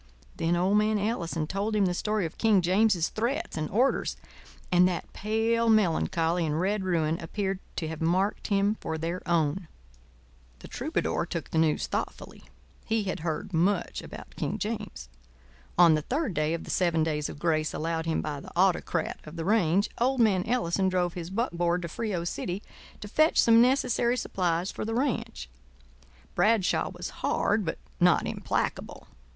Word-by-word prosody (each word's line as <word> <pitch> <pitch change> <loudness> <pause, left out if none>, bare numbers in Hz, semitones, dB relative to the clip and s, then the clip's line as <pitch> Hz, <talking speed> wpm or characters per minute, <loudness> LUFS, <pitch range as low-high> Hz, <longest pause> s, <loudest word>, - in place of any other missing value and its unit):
Then 165 +1 +1
old 190 +4 +3
man 215 0 +2
Ellison 175 -7 -2
told 200 +6 -2
him 205 -2 +3
the 180 - +1
story 210 +1 -1
of 160 - -7
King 210 -5 +4
James's 185 -1 +3
threats 235 +6 -2
and 155 -1 -2
orders 250 +7 +1 0.5
and 180 0 +6
that 180 -2 -4
pale 225 +2 +1
melancholy 170 -4 +2
and 155 0 -1
red 195 +2 0
ruin 165 -3 0
appeared 190 +3 -3 0.2
to 160 - -3
have 160 0 -6
marked 185 +5 0
him 200 +1 +1
for 160 - -3
their 170 +3 -3
own. 170 +1 +1 0.9
The - - -12
troubadour - - -2
took - - -5
the 160 - +1
news 160 -2 +2
thoughtfully. - - -5 0.4
He 220 -1 0
had 190 - -3
heard 170 +5 -4
much 180 +5 +1
about - - -11
King - - -2
James. 210 - -5 0.7
On 170 -2 +7
the 155 - +1
third 265 - -2
day 155 +1 0
of 165 - -6
the - - -6
seven 170 -3 +2
days 150 -2 -1
of - - -8
grace 155 -1 0
allowed 165 +1 -2
him 160 - 0
by 150 -2 -4
the - - -11
autocrat 175 -2 +1
of 155 +2 -10
the 165 -1 -4
range, 195 -1 +3
old 260 +2 +1
man 200 -6 +3
Ellison 195 -5 +1
drove 180 -2 0
his 170 -1 -6
buckboard 175 -5 0
to - - -3
Frio 195 -1 -3
City 180 +3 -4 0.4
to 205 - -6
fetch 310 +9 +3
some 230 0 +6
necessary 250 -1 +2
supplies 180 -5 -1
for - - -5
the 225 +1 -2
ranch. 235 - -2 0.9
Bradshaw 215 -3 +2
was - - -7
hard - - +1
but - - -3 0.2
not - - +4
implacable. - - -3
185 Hz, 170 wpm, -28 LUFS, 165-215 Hz, 0.9 s, On